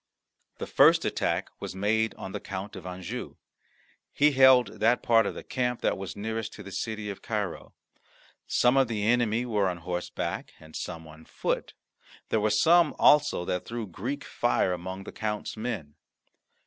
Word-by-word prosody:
The - - -4
first - - +5
attack - - -1
was - - -6
made 110 +3 +1
on 95 - -7
the - - -4
Count 95 +1 -6
of - - -8
Anjou. 90 -1 -6 0.8
He 150 +1 +4
held 130 -2 +5
that 115 +3 +3
part 115 -3 +4
of - - -4
the - - -7
camp 125 -2 -2
that - - +1
was 95 0 -6
nearest 110 +1 -4
to 105 - -10
the 100 - -10
city 110 +2 -3
of 100 - -10
Cairo. 105 -6 -4 0.7
Some 125 +2 +3
of 135 -1 +4
the 110 -3 -2
enemy 120 0 +2
were 105 -5 +1
on 90 - -4
horseback 90 +1 -4
and 80 0 -14
some 80 -2 -6
on 80 +1 -14
foot; - - -3 0.5
there 110 - +1
were 110 - +2
some 160 +9 +4
also 150 -11 +4
that 90 0 -2
threw 115 -1 -4
Greek 120 +10 -5
fire 120 -6 +1
among 95 +2 -6
the - - -8
count's 105 -1 -4
men. 110 -10 -4
110 Hz, 175 wpm, -28 LUFS, 95-120 Hz, 0.8 s, first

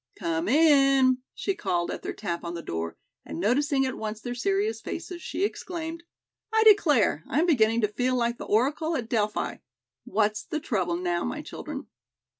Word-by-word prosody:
"Come 165 +1 -2
in," 275 -2 +5 0.2
she 390 - -1
called 175 - -1
at - - -5
their - - -4
tap 175 -5 -4
on 170 0 -4
the 170 - -6
door, 80 0 -4 0.3
and - - -7
noticing 270 - +2
at 260 - -2
once 215 0 -4
their 245 +3 -5
serious 395 - 0
faces, 350 -2 -6
she 365 - -3
exclaimed: 335 -4 -4 0.5
"I 440 0 +4
declare, 295 - +5
I 250 - -1
am 325 - +4
beginning 230 -8 +3
to 210 - +3
feel 250 +5 0
like 235 -1 0
the - - -5
Oracle 290 +9 +1
at 240 -6 -3
Delphi. 215 -3 -1 0.5
What's 210 +1 +1
the 310 - -4
trouble, 185 - -1
now, 175 -1 -1
my 80 - -4
children?" - - -7
245 Hz, 180 wpm, -27 LUFS, 205-310 Hz, 0.5 s, in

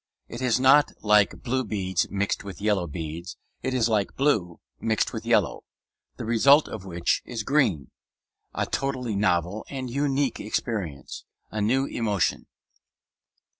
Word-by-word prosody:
It 120 - -8
is 125 -1 +2
not 135 +3 +5
like 105 -1 +3
blue 130 +2 0
beads 95 -4 -1
mixed 100 +1 -1
with 100 -3 -8
yellow 100 -4 +1
beads; 80 +3 -6 0.2
it 130 - -2
is 125 -3 +2
like 105 -3 0
blue 110 - +1 0.2
mixed 110 -1 0
with - - -6
yellow; - - +2 0.5
the - - -5
result 135 +7 +5
of 105 -3 -7
which 85 -2 0
is 115 -3 -5
green, 110 - +1 0.6
a - - -1
totally 130 -5 -2
novel 95 0 0
and 130 -3 -5
unique 140 0 0
experience, 100 - -4 0.3
a 105 - -2
new 130 +6 +2
emotion. 105 -8 -1
110 Hz, 140 wpm, -26 LUFS, 95-130 Hz, 0.6 s, not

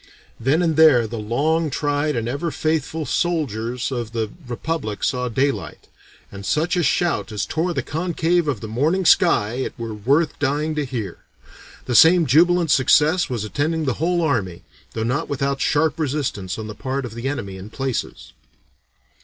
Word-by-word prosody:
Then 140 +9 +2
and 160 -3 0
there 150 -7 +6
the 115 +1 -5
long 150 +9 0
tried 145 +1 -1
and 115 -1 -2
ever 145 +7 -2
faithful 155 0 -2
soldiers 125 -9 -1
of 120 -3 -4
the 110 -2 -2 0.2
Republic 120 -4 -4
saw 125 0 0
daylight 135 +4 -2 0.4
and 100 0 -9
such 155 - 0
a 175 - +2
shout 170 -4 0
as 105 -2 -2
tore 170 +2 -2
the - - -1
concave 170 +1 0
of 130 -9 -2
that 110 - -5
morning 155 - 0
sky 110 -6 +4
it 130 - -4
were 115 -2 -5
worth 140 +10 +1
dying 145 +2 0
to 150 -1 -2
hear." 115 -9 -5 0.7
The 125 - -2
same 165 +6 +7
jubilant 170 +4 +4
success 150 +6 +4
was 120 -5 -2
attending 155 +8 -1
the 130 - +1
whole 175 +1 +1
army, 100 - -1 0.3
though 110 - -1
not 125 +5 -1
without 140 0 -1
sharp 155 +2 +1
resistance 130 - -2
on 110 - -5
the 105 - -6
part 130 +6 -3
of 115 - -8
the 120 +3 -4
enemy 100 -9 -4
in 95 +3 -9
places. 130 +2 -4
140 Hz, 170 wpm, -21 LUFS, 115-160 Hz, 0.7 s, same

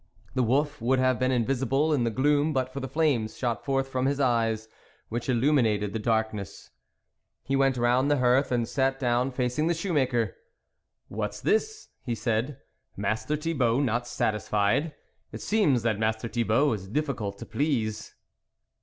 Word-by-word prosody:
The 130 - +1
wolf 145 +4 +1
would 130 +3 +2
have 130 -2 +2
been 130 - +1
invisible 135 +4 +1
in 125 -5 +1
the - - +1
gloom 145 +6 +2
but 130 -1 -1
for 140 - -4
the 135 - -4
flames 135 -7 0
shot 120 -2 -2
forth 135 -1 0
from 130 0 -1
his 140 0 0
eyes, 115 -4 +1 0.4
which 120 +3 -4
illuminated 115 -6 +2
the 110 - -2
darkness; 110 -4 -2 0.7
he 135 - -1
went 135 -1 +2
round 125 +3 +2
the 145 - +3
hearth 125 +2 +3
and 120 -2 +1
sat 135 -1 0
down 125 0 +1
facing 125 +4 -1
the 170 - +1
shoemaker. 135 - 0 0.4
" - - -53 0.3
What - - -4
is - - -9
this! 435 0 0
" - - -48
he 120 - 0
said. 115 +4 -1 0.2
" - - -47
Master 110 +9 -1
Thi 165 +2 -2
bault 125 -1 +2
not 120 -1 -1
satisfied? 105 +7 0 0.4
It - - -7
seems 155 - +2
that 110 -3 0
Master 110 +1 -1
Thibault 120 +4 +2
is 95 -3 -6
difficult 110 -5 -2
to - - -8
please." 110 -7 -2
125 Hz, 175 wpm, -27 LUFS, 115-140 Hz, 0.7 s, the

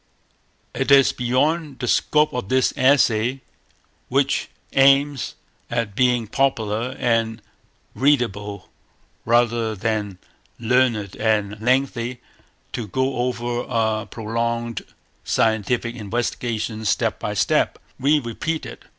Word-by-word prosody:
It - - -2
is 140 -1 +6
beyond 145 +4 0
the 125 - -4
scope 150 +5 +2
of 125 -6 -4
this 130 -1 +2
essay, 130 -2 +3 0.7
which 135 +1 +1 0.2
aims 140 0 +3 0.3
at 115 -3 -2
being 125 -1 +2
popular 120 -1 -1
and 115 -2 0 0.5
readable 105 -8 0 0.6
rather 115 -1 +2
than 105 -2 -2 0.4
learned 115 -4 +1
and 110 -1 0
lengthy, 125 0 0 0.5
to 115 -3 -4
go 130 +5 -1
over 120 -1 -1
a 110 -1 0
prolonged 115 0 -3 0.4
scientific 115 +2 0
investigation 115 0 -3
step 110 - 0
by - - -3
step. - - +1 0.2
We 145 +4 +4
repeat 150 +5 -3
it. - - -10
120 Hz, 105 wpm, -22 LUFS, 110-130 Hz, 0.7 s, is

